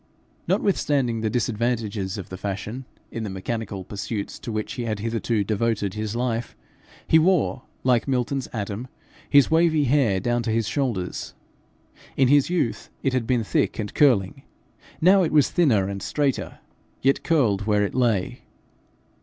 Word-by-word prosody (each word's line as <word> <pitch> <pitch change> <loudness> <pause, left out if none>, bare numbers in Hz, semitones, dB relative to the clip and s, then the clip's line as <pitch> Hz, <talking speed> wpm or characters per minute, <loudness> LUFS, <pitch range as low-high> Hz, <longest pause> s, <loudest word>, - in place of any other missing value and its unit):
Notwithstanding 135 - +1
the 110 - 0
disadvantages 110 -4 -1
of 100 - -7
the 95 - -7
fashion, 105 +6 -5 0.3
in 115 - -4
the 110 - -3
mechanical 100 0 -4
pursuits 100 +2 -5
to 115 - -6
which 110 -1 -3
he 120 - -4
had 110 -2 -2
hitherto 115 0 -1
devoted 105 -1 -1
his 110 +1 -4
life, 120 -1 -2 0.5
he 160 - +6
wore, 160 -6 +1 0.2
like 125 -1 +2
Milton's 130 0 -1
Adam, 105 +2 -4 0.4
his 145 +1 +5
wavy 160 -2 +4
hair 130 -8 +2
down 120 +4 0
to 115 - -3
his 110 -1 0
shoulders. 120 -11 -2 0.8
In 130 -2 +4
his 145 +1 +4
youth, 175 -10 -1
it 135 - +1
had 125 -3 0
been 125 -3 +1
thick - - 0
and 105 -2 -4
curling; 115 -10 +3 0.6
now 190 +4 +6
it 170 - +1
was 150 -3 +4
thinner 120 - +3
and 100 0 -5
straighter, 140 +4 -1 0.5
yet 135 +1 +3
curled 110 - +1
where 105 -1 +3
it 100 - -2
lay. 115 -7 0
115 Hz, 155 wpm, -24 LUFS, 105-135 Hz, 0.8 s, he